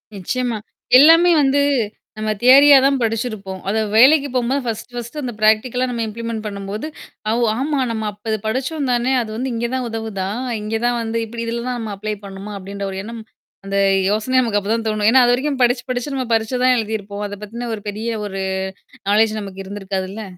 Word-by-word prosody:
நிச்சயமா. 235 +4 -2 0.4
எல்லாமே 330 +5 +7
வந்து 280 +1 +3 0.6
நம்ம 215 0 -1
தியரியா 275 +3 +8
தான் 275 -1 +3
படிச்சிருப்போம். 215 -4 -3
அத 220 - 0 0.2
வேலைக்கு 280 +5 +6
போம்போது 255 +3 +1
1 225 +1 -4
1 240 +5 -6
அந்த 245 -3 -4
பிராக்டிகலா 230 +4 +2
நம்ம 235 -2 -2
இம்ப்ளிமென்ட் 230 0 -5
பண்ணும்போது, 200 +5 -5 0.4
அ - - +2
ஓ - - +3 0.2
ஆமா 285 0 0
நம்ம 220 -1 -3
அப்ப 215 +2 -3
படிச்சோம் 270 +4 -2
தானே 245 +2 +1
அது 220 - -5
வந்து 255 +2 -2
இங்க 235 +1 -1
தான் 250 -2 -2
உதவுதா? 220 -4 -4 0.3
இங்க 215 +1 -3
தான் 240 0 +1
வந்து 230 0 -2
இப்டி 230 +1 -6
இதில 235 +1 -3
தான் 250 -1 -2
நம்ம 215 -2 -4
அப்ளை 215 +1 -3
பண்ணுமா? 195 +2 -8
அப்டின்ற 200 +1 -6
ஒரு 190 - -5
எண்ணம். 230 +1 -7 0.4
அந்த 195 0 -2 0.3
யோசனைய 255 +5 +1
நமக்கு 215 -4 +1
அப்ப 200 +1 -6
தான் 230 -1 -2
தோணும். 215 -1 +1
ஏன்னா 260 0 +6
அது 245 - +4
வரைக்கும் 270 +1 -1
படிச்சு, 245 +1 +2
படிச்சு 250 +3 -3
நம்ம 260 -1 -2
பரிச்ச 225 +2 0
தான் 255 0 +5
எழுதியிருப்போம். 210 -2 -4
அத 205 - -7
பத்தினு 235 +3 -6
ஒரு 205 - -11
பெரிய 220 +3 -4 0.2
ஒரு 195 -1 -5 0.7
நாலேட்ஜ் 215 +1 +3
நமக்கு 195 -1 -7
இருந்திருக்காதுல்ல. 195 +1 -4
225 Hz, 190 wpm, -20 LUFS, 210-250 Hz, 0.7 s, தியரியா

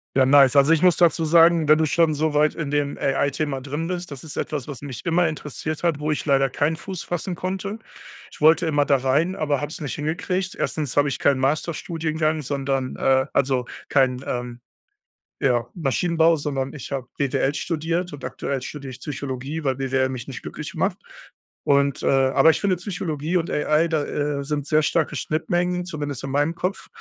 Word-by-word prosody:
Ja, 135 - +5
nice. 135 0 +6
Also, 140 +4 +6
ich 160 - +2
muss 180 -3 +5
dazu 170 -1 +3
sagen, 165 -1 +5
wenn 155 - +7
du 160 - +2
schon 160 +1 +2
so 155 +1 0
weit 150 +1 +3
in 155 -4 -4
dem 145 -1 -1
AI-Thema 140 0 -1
drin 145 +5 -4
bist. 180 -2 -4
Das 140 +1 -8
ist 155 - -7
etwas, 150 -3 -3
was 140 -3 -7
mich 130 -7 -7
immer 170 0 +2
interessiert 155 +1 -5
hat, 165 -4 +1
wo 150 +1 -1
ich 150 - -2
leider 135 -2 +3
keinen 145 +5 0
Fuß 185 +1 -7
fassen 175 +1 -3
konnte. 195 +4 -4 0.5
Ich - - -16
wollte 160 +3 +5
immer 145 -2 +2
da 140 -1 +3
rein, 140 +8 +1
aber 145 -3 0
habe 145 0 -4
es - - -7
nicht 145 -4 -4
hingekriegt. 180 +5 -2
Erstens 150 -4 -2
habe 145 0 +4
ich 140 - -2
keinen 140 -2 +2
Masterstudiengang, 155 +2 -1
sondern, 135 -2 -2
äh 130 0 +2
also 130 -3 +1 0.2
kein, 130 -2 +2
ähm, 120 -1 -4 0.8
ja, 120 -3 +1
Maschinenbau, 165 +2 +2
sondern 140 -3 -3
ich 140 -2 -8
habe 135 -3 -3
BWL 140 0 0
studiert. 165 +3 -2
Und 145 -3 -8
aktuell 130 +1 -3
studiere 140 0 -7
ich 130 - -10
Psychologie, 140 +2 -5
weil 135 -2 +1
BWL 130 -1 0
mich 125 -3 -6
nicht - - -7
glücklich - - -7
macht. - - 0 0.7
Und, 140 -1 +2
äh - - 0
aber 135 +3 +4
ich 160 - +3
finde, 195 -2 +1
Psychologie 175 -3 -2
und 170 - -2
AI 155 +2 +2
da, 160 -3 0
äh, 145 -1 -2
sind 145 0 -3
sehr 155 0 +3
starke 155 0 0
Schnittmengen, 175 +5 -1
zumindest 145 -6 -5
in 135 - -5
meinem 145 +4 +1
Kopf. 185 +4 -3
150 Hz, 195 wpm, -23 LUFS, 135-165 Hz, 0.8 s, wenn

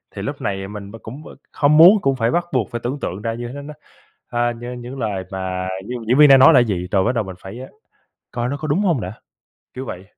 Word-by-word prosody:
thì - - -5
lúc - - -5
này 95 0 -3
mình 100 -1 -9
b - - -10
cũng, 135 +7 -9
ơ, - - -12 0.2
không 150 +1 +3
muốn 185 +6 +8
cũng 135 -3 +1
phải 115 -1 0
bắt 175 0 0
buộc 125 -5 0
phải 120 -1 -4
tưởng 135 +4 -3
tượng 95 -2 -5
ra 115 +1 -2
như 120 +1 -6
thế 140 +4 -7
nó, 150 +1 -9 0.6
a, 120 0 0
nh 120 +1 -8
những 125 +3 -8
lời 100 -5 -3
mà 95 -1 -4 0.2
d - - -7 0.2
diễn 125 +4 +3
viên 150 - +8
đang 135 -1 +8
nói 150 +5 +8
là 125 - +7
gì, 95 -6 -1
rồi 95 -2 +2
bắt - - +1
đầu 115 -4 -1
mình 95 -1 -8
phải, 95 +5 -10
ơ, 130 +1 -8 0.6
coi 120 0 -2
nó 140 - -3
có 155 +1 -5
đúng 150 +6 +1
hông 170 - +1
đã, 95 -1 -5 0.6
kiểu 130 - -6
vậy. 95 -2 -7
120 Hz, 270 wpm, -20 LUFS, 100-135 Hz, 0.6 s, muốn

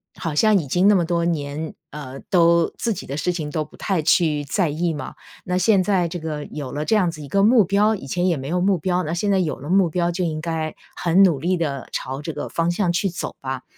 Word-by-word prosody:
好 165 -4 -4
像 215 +4 +4
已 145 - -5
经 180 +8 +3
那 210 - +6
么 175 - +3
多 170 0 0
年， 155 -1 -3 0.2
呃， 135 -3 -8
都 170 -2 +4
自 230 -2 -1
己 195 - -8
的 140 +2 -4
事 180 +5 0
情 155 -4 -4
都 155 0 -2
不 - - -18
太 190 -6 -1
去 155 -3 +2
在 175 +3 0
意 165 +3 -1
嘛。 145 -3 -7 0.3
那 180 0 -1
现 195 0 +3
在 185 -3 +1
这 175 +1 -5
个 155 -2 -5
有 145 -4 -7
了 150 +2 -3
这 220 - +2
样 185 -5 +3
子 155 -2 -9
一 - - -8
个 195 +8 +1
目 225 0 +6
标， 205 +3 +2
以 160 - -9
前 180 +6 0
也 170 -4 +1
没 135 - -6
有 180 +4 0
目 190 0 +3
标， 180 +3 0
那 155 - -3
现 200 +4 0
在 195 - +3
有 170 -5 -1
了 145 - -8
目 190 -1 +4
标 175 +1 0
就 180 +1 -2
应 155 -2 -2
该 160 -1 -3 0.2
很 180 +3 +4
努 170 -7 +3
力 180 +4 0
地 140 -5 -3
朝 135 +2 -4
这 160 - -4
个 145 - -5
方 165 0 0
向 180 -1 0
去 195 +2 +1
走 170 - -5
吧。 130 -1 -4
170 Hz, 285 characters per minute, -22 LUFS, 150-185 Hz, 0.3 s, 那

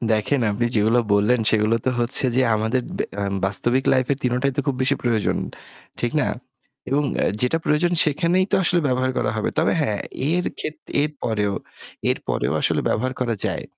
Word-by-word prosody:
দেখেন 110 +6 +1
আপনি 110 +4 0
যেগুলো 110 +3 +3 0.2
বললেন 110 +4 +3
সেগুলো 110 +1 +2
তো 130 - +2
হচ্ছে 120 +3 +1
যে 130 - +4
আমাদের 110 +4 0 0.2
বে - - +1 0.2
আ - - -1 0.2
বাস্তবিক 120 +7 +1
লাইফের 130 +1 +2
৩ 125 -1 +1
টাই 140 -1 +2
তো - - +2
খুব 135 -2 0
বেশি 135 +2 +3
প্রয়োজন। 115 -4 +1 0.6
ঠিক - - -1
না? - - 0 0.6
এবং 145 +2 +2 0.4
যেটা 125 +6 +1
প্রয়োজন 170 +4 +2
সেখানেই 170 +5 +2
তো - - +5
আসলে 175 0 +3
ব্যবহার 130 0 +1
করা 110 - 0
হবে। 110 - -1
তবে 160 - +3
হ্যাঁ, 105 -8 -1 0.3
এর 180 +1 +1
খে - - -2 0.3
এরপরেও, 110 -9 -1 0.6
এরপরেও - - -1
আসলে - - +2
ব্যবহার 130 +4 0
করা 120 -2 0
যায়। - - -3
125 Hz, 175 wpm, -22 LUFS, 110-145 Hz, 0.6 s, তো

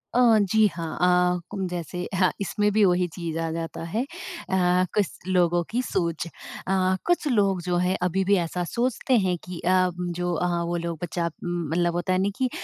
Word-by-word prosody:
अ, - - +4 0.2
जी 215 +2 +3
हाँ। 165 -2 -5
अ 180 0 +3
उम, 195 -2 -2
जैसे 180 0 -4
अह 185 -1 +3
इसमें 205 +1 +1
भी 215 0 +4
वही 180 -1 +3
चीज़ 165 -3 -4
आ 165 0 -1
जाता 165 0 -5
है। 210 +9 -1
अ, 190 - -1
कुछ 205 -4 +2 0.2
लोगों 175 -2 +2
की 245 +3 0
सोच 170 -8 -2
अ, 185 +2 -2
कुछ 350 -3 +1
लोग 200 -8 +2
जो 175 0 -1
है 180 +1 +1
अभी 180 +2 +1
भी 200 +2 +4
ऐसा 175 +1 -2
सोचते 245 +6 0
हैं 185 -3 0
कि 180 -2 -7
अ, 185 0 +3
जो 175 0 -2
अ, 175 +2 0 0.2
वो 170 +1 -2
लोग 170 -1 -3
बच्चा 170 0 -1
मतलब 175 0 0
होता 175 +1 0
है 185 - +2
ना, 195 - +2
कि 260 -1 +1
180 Hz, 195 wpm, -25 LUFS, 175-195 Hz, 0.2 s, अ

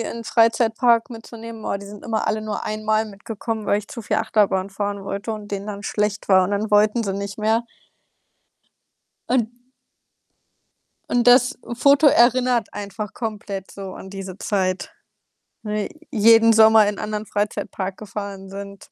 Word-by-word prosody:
in 230 - -3 0.2
'n - - -19
Freizeitpark 230 +1 +3
mitzunehmen. 230 -1 -9
Boah, 200 - -2
die 200 - -10
sind 205 0 -11
immer 220 -2 -1
alle 215 0 0
nur 215 -1 -4
einmal 215 +1 0
mitgekommen, 215 +1 -6
weil 205 - +2
ich 210 - -8
zu 235 - -7
viel - - -1
Achterbahn 200 -3 +1
fahren 200 0 -4
wollte 200 +3 -4
und 210 -1 -7
denen 200 0 -4
dann 200 -1 -6
schlecht 210 0 -2
war 185 -1 +6
und 185 - -3
dann 205 +1 -1
wollten 210 +2 +3
sie 195 - -2
nicht 200 +1 -5
mehr. 220 +2 +1 1.6
Und 240 -3 +2 1.6
und 245 0 +2
das 245 0 +5
Foto 280 +5 +4
erinnert 245 -3 +3
einfach 205 +1 -6
komplett 205 -4 -5
so 195 -1 -8
an 190 - -10
diese 195 -2 -7
Zeit, 195 - -2 0.7
ne, 210 -1 -2 0.2
jeden 225 -1 +6
Sommer 220 -1 +7
in 205 - -3
anderen 210 0 -3
Freizeitpark 195 -2 -3
gefahren 200 -2 -7
sind. 200 0 -8
210 Hz, 155 wpm, -22 LUFS, 200-225 Hz, 1.6 s, Sommer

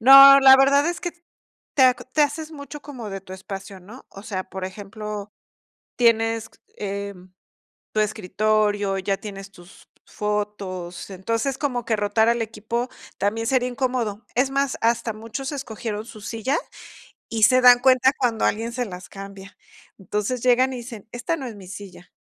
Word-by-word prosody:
No, 275 +3 +10
la 265 0 +9
verdad 280 +2 +4
es 340 -2 -2
que 350 - -3 0.6
te 270 - +4
aco 250 -1 +4
te 260 +4 +1
haces 310 +2 -2
mucho 290 0 -9
como 250 -8 -8
de 195 0 -5
tu 185 0 -12
espacio, 195 0 -8
¿no? 215 +8 -13
O 195 - -12
sea, 190 -3 -4
por 190 -1 -6
ejemplo, 205 +1 -7 0.6
tienes, 225 -1 +2 0.3
em, 200 -2 -6 0.6
tu 215 - +2
escritorio, 210 0 0
ya 195 +1 0
tienes 195 -2 -9
tus 175 0 -17 0.2
fotos, 205 -4 -4
entonces, 230 +8 -2
como 250 -5 -2
que 225 - +1
rotar 210 +2 +2
al 235 0 +2
equipo 225 +2 -3 0.3
también 225 +3 -1
sería 250 -1 +2
incómodo. 245 -4 -2
Es 260 +2 +2
más, 275 0 0
hasta 230 -1 +1
muchos 230 +6 -6
escogieron 220 -5 -5
su 220 - -11
silla, 230 +8 -1 0.7
y 225 -2 -1
se 255 +3 +6
dan 245 -1 +8
cuenta 260 0 +5
cuando 235 -4 +1
alguien 230 +2 -1
se 250 0 -2
las 180 -2 -9
cambia. 195 0 -10 0.4
Entonces 210 +5 -3
llegan, 255 +1 +4
y - - -5
dicen: 235 -3 -9
"Esta 245 +7 -2
no 270 -5 -6
es 230 - -8
mi 195 -2 -12
silla". 185 -2 -10
225 Hz, 165 wpm, -23 LUFS, 200-255 Hz, 0.7 s, No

